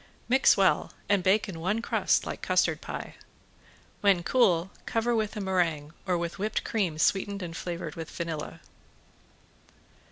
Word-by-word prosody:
Mix 260 +2 +5
well 195 -1 +2
and 200 -2 +3
bake 195 +5 +3
in 175 -5 -7
one 190 +7 0
crust 230 - +1
like - - -5
custard - - +1
pie. - - -7 0.8
When 195 -4 +3
cool 190 -6 +3 0.2
cover 230 +1 +1
with 215 -1 -1
a - - -2
meringue 170 -6 0
or 180 -1 +2
with 170 +2 -4
whipped 210 +2 -1
cream 190 -9 -1
sweetened 200 +4 +1
and 165 -2 -6
flavored 175 0 -5
with 165 -2 -7
vanilla. 165 -3 -5
190 Hz, 150 wpm, -28 LUFS, 170-205 Hz, 0.8 s, Mix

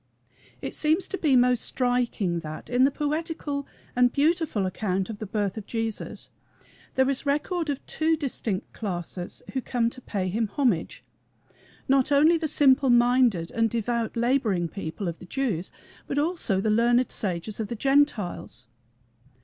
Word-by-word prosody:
It - - -4
seems 315 +4 +2
to 390 - -3
be 290 -5 +3
most 250 -1 +4
striking 245 -8 0
that, 155 +6 -8
in 250 +1 +5
the - - +4
poetical 295 -1 -3 0.3
and 245 0 +4
beautiful 300 - +1
account 190 +1 -1
of 210 - -8
the 215 - -5
birth 205 0 -2
of 210 - -7
Jesus, 225 -2 -3 0.6
there 265 0 +3
is 275 +1 -2
record 310 +3 0
of 280 -2 -3
two 320 0 +1
distinct 240 -9 -3
classes 180 -3 -5
who 265 - -1
come 235 -2 0
to 255 - -11
pay 195 -5 -2
him 220 +4 0
homage 210 - 0 0.8
not 270 +1 +3
only 305 +4 +6
the 325 -1 -1
simple 275 -2 +4
minded 240 -7 +3
and 225 0 +1
devout 235 +1 -2
laboring 230 -8 +1
people 180 +2 -5
of 170 -1 -4
the - - -11
Jews, 210 -8 -2 0.4
but 275 - -3
also 295 - +1
the 215 +2 +1
learned 240 +3 +3
sages 195 +2 -2
of 220 - -2
the 235 - -4
Gentiles. 230 - 0
240 Hz, 155 wpm, -26 LUFS, 200-280 Hz, 0.8 s, only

